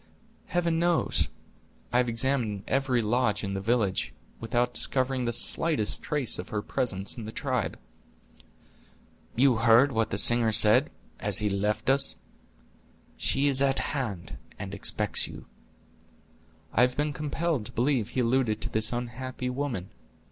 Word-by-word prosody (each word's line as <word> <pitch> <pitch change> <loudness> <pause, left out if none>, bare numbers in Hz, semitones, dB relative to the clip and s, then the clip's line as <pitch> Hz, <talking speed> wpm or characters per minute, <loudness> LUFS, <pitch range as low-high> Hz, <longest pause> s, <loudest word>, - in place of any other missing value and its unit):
"Heaven 170 -2 -1
knows. 170 -1 +1 0.7
I - - +3
have 125 -1 +1
examined 115 -4 +1
every 130 -3 0
lodge 105 -2 0
in 100 -1 -4
the 95 - -4
village, 105 -3 -1 0.3
without 120 +2 -1
discovering 130 -1 +2
the 120 - -1
slightest 130 0 +1
trace 145 -10 -2
of 90 - -7
her 105 -1 -3
presence 100 -2 -2
in 115 - -7
the 110 - -7
tribe." 130 -3 -3 1.6
"You 130 -1 +3
heard 115 +4 +4
what 115 -2 -1
the 95 - -3
singer 115 +2 +6
said, 105 0 +5 0.3
as 100 -1 +3
he 105 -1 +2
left 105 +2 -2
us: 135 +1 +2 1.0
'She 135 - 0
is 135 -2 +2
at 135 -1 +1 0.2
hand, 95 - -5 0.2
and 100 -1 -7
expects 100 - 0
you'?" - - -11 1.3
"I 110 - +3
have 125 0 +2
been 150 0 -1
compelled 150 -5 -3
to - - -12
believe 125 -3 0
he 130 - -2
alluded 120 -3 0
to - - -3
this 110 0 +1
unhappy 125 +1 -5
woman." 125 -9 -4
120 Hz, 150 wpm, -27 LUFS, 105-135 Hz, 1.6 s, singer